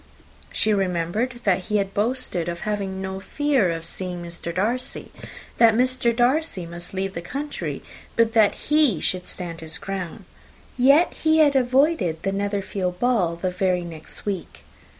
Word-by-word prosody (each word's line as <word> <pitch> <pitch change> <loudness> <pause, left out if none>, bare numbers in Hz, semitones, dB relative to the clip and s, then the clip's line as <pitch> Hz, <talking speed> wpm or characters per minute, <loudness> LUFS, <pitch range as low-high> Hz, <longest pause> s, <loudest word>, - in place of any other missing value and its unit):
She 215 - +2
remembered 195 +6 -1
that 185 -2 +2
he 210 - +1
had 195 -1 -1
boasted 205 -6 -1
of 170 0 -5
having 195 -2 -3
no 190 0 -4
fear 270 -1 +1
of 165 -1 -3
seeing 180 0 -4
Mr. 170 0 -5
Darcy 225 +8 -2 0.5
that 230 -2 +6
Mr. 255 0 +3
Darcy 245 - +1
might 170 +1 -8
leave 195 0 -2
the 170 - -4
country, 280 +11 -5 0.3
but 230 -1 +3
that 220 -3 +5
he 295 - +4
should 180 +2 -2
stand 170 -2 -3
his 160 0 -4
ground; 190 -4 -5 0.5
yet 280 +7 +5
he 315 0 +2
had 295 -3 +5
avoided 255 - +2
the 195 - 0
Netherfield 195 -2 -2
ball 220 -9 +2
the 180 +2 -2
very 180 -1 0
next 165 -2 -6
week. 195 -4 -4
195 Hz, 155 wpm, -23 LUFS, 180-245 Hz, 0.5 s, that